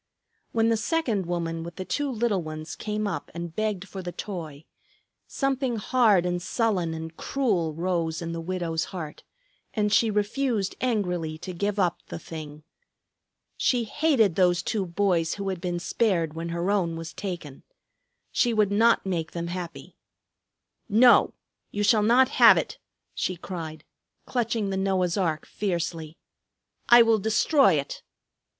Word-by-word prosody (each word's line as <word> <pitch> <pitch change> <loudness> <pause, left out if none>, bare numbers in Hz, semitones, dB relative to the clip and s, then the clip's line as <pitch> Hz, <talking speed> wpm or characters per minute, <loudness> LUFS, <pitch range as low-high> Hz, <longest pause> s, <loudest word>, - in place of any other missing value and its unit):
When 225 0 +2
the 225 - +2
second 225 - -1
woman 165 -2 -2
with 170 +1 -8
the 185 - -5
two 290 +6 -1
little 225 -5 0
ones 155 0 -7
came 210 0 -3
up 200 -4 -4
and 170 -1 -6
begged 210 -3 -2
for 190 - -7
the 175 -1 -5
toy, 160 -7 -7 0.6
something 270 -3 -1
hard 215 -4 +3
and 175 0 -1
sullen 185 -5 0
and 160 0 -7
cruel 185 - -1
rose 165 -2 -1
in 170 -1 -4
the 165 0 -4
widow's 165 -2 -2
heart, 160 -5 -7 0.5
and 210 -1 +1
she 225 - +4
refused 210 0 0
angrily 180 -10 -1
to 185 +3 -7
give 200 +4 -2
up 180 -4 +1
the - - -6
thing. 155 -2 -9 0.9
She 245 -2 +2
hated 225 - +2
those 175 0 +2
two 195 -2 -1
boys 170 -2 +1
who 200 -1 -3
had 185 -3 -4
been 175 -1 -2
spared 170 -2 0
when 165 +1 -5
her 170 +3 -1
own 175 -5 0
was 165 0 -7
taken. 175 -8 -6 0.7
She 240 -2 +2
would 210 -2 +3
not 225 +2 +4
make 170 -4 -2
them 170 0 -4
happy. 175 -1 -7 0.9
"No, 235 +4 +5 0.3
you 205 - -2
shall 210 +1 +4
not 240 +5 +5
have - - +9
it," - - -3 0.3
she 185 - -2
cried, 160 -4 -7 0.4
clutching 230 -4 -1
the 190 - -1
Noah's 190 -2 +1
ark 165 -6 -1
fiercely. 170 -5 -3 0.7
"I 240 0 +9
will 225 -1 +3
destroy 220 - +4
it." 140 -2 -2
185 Hz, 155 wpm, -26 LUFS, 165-215 Hz, 0.9 s, have